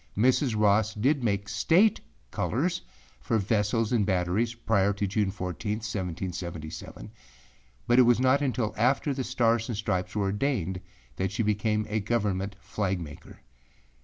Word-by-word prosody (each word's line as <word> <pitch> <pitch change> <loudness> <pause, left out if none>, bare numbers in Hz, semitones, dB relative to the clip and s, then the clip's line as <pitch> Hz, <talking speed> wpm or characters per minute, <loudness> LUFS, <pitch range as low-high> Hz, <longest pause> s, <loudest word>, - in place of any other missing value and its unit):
Mrs. 125 0 +2
Ross 105 +1 +3
did 130 +5 +1
make 100 -3 0
State 165 - +3 0.3
colors - - -1 0.4
for 65 - 0
vessels 105 +2 0
and 115 -4 +3
batteries 95 +5 0
prior 100 -3 +1
to 100 +1 -2
June 100 0 0
14, 95 +2 -3
1777, 90 -6 -5 0.7
but 120 +1 +4
it - - +10
was 120 -1 +4
not 130 +2 +3
until 125 -6 -1
after 135 +4 +2
the 130 -1 -3
Stars 115 -2 +1
and 115 - -2
Stripes 95 -4 -2
were 105 - +1
ordained 100 - -1 0.4
that 95 0 -1
she 115 +3 -1
became 105 0 0
a 105 +1 -1
Government 100 -3 -1
flag 95 -1 -2
maker. 75 -4 -10
105 Hz, 145 wpm, -27 LUFS, 95-120 Hz, 0.7 s, it